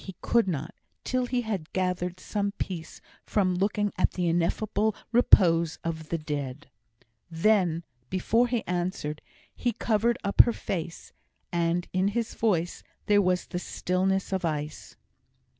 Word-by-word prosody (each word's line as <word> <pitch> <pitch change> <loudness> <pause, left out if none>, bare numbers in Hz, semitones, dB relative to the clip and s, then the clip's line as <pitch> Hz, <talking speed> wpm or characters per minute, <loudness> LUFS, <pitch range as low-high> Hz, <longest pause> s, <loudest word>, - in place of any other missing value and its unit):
He 190 - -8
could 235 -3 +2
not, 160 -2 -3 0.3
till 255 -1 0
he 250 0 0
had 200 -8 -4
gathered 180 -1 -1
some 200 +1 -2
peace 165 -6 -6 0.2
from 190 -3 +1
looking 205 +2 0
at - - +3
the 180 -2 -1
ineffable 200 +5 +1 0.2
repose 170 -8 +5
of 160 -2 -4
the 170 - 0
Dead. 145 -3 -5 0.6
Then, 170 -1 +2 0.3
before 225 +6 +2
he 240 -2 -1
answered, 175 -4 -2 0.3
he 240 - -1
covered 230 +1 +1
up 200 - +7
her 235 - +1
face; 170 -5 -5 0.4
and 170 0 0
in 185 +1 +2
his 235 0 -1
voice 175 -6 0 0.2
there 205 -1 +5
was 180 -1 +1
the 175 - -4
stillness 190 +2 -1
of 190 -1 -1
ice. 150 -2 -4
185 Hz, 140 wpm, -27 LUFS, 170-210 Hz, 0.6 s, up